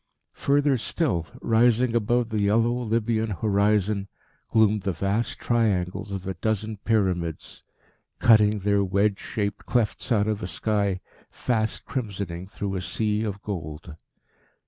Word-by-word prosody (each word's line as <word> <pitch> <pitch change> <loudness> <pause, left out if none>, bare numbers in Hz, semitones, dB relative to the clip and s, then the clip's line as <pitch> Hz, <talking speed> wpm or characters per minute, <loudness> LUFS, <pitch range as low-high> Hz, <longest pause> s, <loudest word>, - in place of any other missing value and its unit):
Further 140 -2 +2
still, 110 - -1 0.2
rising 120 +1 +3
above 120 +1 +1
the 110 -1 -1
yellow 115 +4 +3
Libyan 115 -2 0
horizon, 100 0 +1 0.4
gloomed 110 -2 +3
the 95 0 -1
vast 100 +7 -1
triangles 100 -4 0
of 95 -1 -5
a 95 - -2
dozen 110 +3 -2
Pyramids, 95 -7 -1 0.5
cutting 105 -2 +5
their 100 0 +2
wedge 100 +1 +1
shaped 100 -2 -4
clefts 120 +1 0
out 105 -3 +3
of 110 -1 -1
a 90 - -3
sky 100 -2 0 0.3
fast 110 -3 -2
crimsoning 100 -7 -4
through 100 -2 -4
a 95 - -2
sea 105 +2 -1
of 105 -2 -4
gold. 80 -4 -6
105 Hz, 130 wpm, -25 LUFS, 100-115 Hz, 0.5 s, cutting